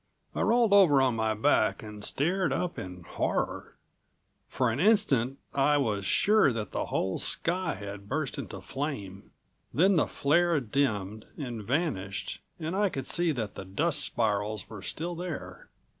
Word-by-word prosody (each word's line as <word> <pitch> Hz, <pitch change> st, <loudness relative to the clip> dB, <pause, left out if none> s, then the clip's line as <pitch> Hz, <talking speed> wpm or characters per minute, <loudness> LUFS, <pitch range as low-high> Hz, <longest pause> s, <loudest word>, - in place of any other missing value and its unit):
I -, -, -2 dB
rolled 230 Hz, -2 st, +3 dB
over 180 Hz, -9 st, +7 dB
on 130 Hz, -3 st, +3 dB
my 110 Hz, -1 st, 0 dB
back 110 Hz, -1 st, +2 dB
and 105 Hz, -1 st, -9 dB
stared 180 Hz, -, 0 dB
up 180 Hz, -1 st, -2 dB
in 90 Hz, -1 st, -8 dB
horror. -, -, -2 dB, 0.7 s
For 125 Hz, -1 st, +1 dB
an 115 Hz, -, -3 dB
instant 145 Hz, -, +3 dB, 0.2 s
I 145 Hz, +2 st, +3 dB
was 105 Hz, -8 st, 0 dB
sure 210 Hz, -, +4 dB
that 110 Hz, -4 st, -4 dB
the -, -, -2 dB
whole 95 Hz, 0 st, -1 dB
sky 175 Hz, 0 st, 0 dB
had 100 Hz, 0 st, -8 dB
burst 145 Hz, 0 st, -2 dB
into 100 Hz, -7 st, -7 dB
flame. 100 Hz, -4 st, -5 dB, 0.4 s
Then 185 Hz, +4 st, +4 dB
the -, -, +3 dB
flare 170 Hz, +3 st, +2 dB
dimmed 110 Hz, -5 st, -1 dB
and 120 Hz, -7 st, -5 dB
vanished 100 Hz, -, -2 dB, 0.2 s
and 165 Hz, +2 st, -3 dB
I 205 Hz, 0 st, +2 dB
could 135 Hz, -6 st, -5 dB
see 175 Hz, -1 st, +1 dB
that 110 Hz, -6 st, -4 dB
the -, -, -7 dB
dust 145 Hz, -, 0 dB
spirals 105 Hz, -6 st, -1 dB
were 105 Hz, -3 st, -9 dB
still 170 Hz, -, -4 dB
there. 155 Hz, -, -7 dB
135 Hz, 160 wpm, -29 LUFS, 105-165 Hz, 0.7 s, over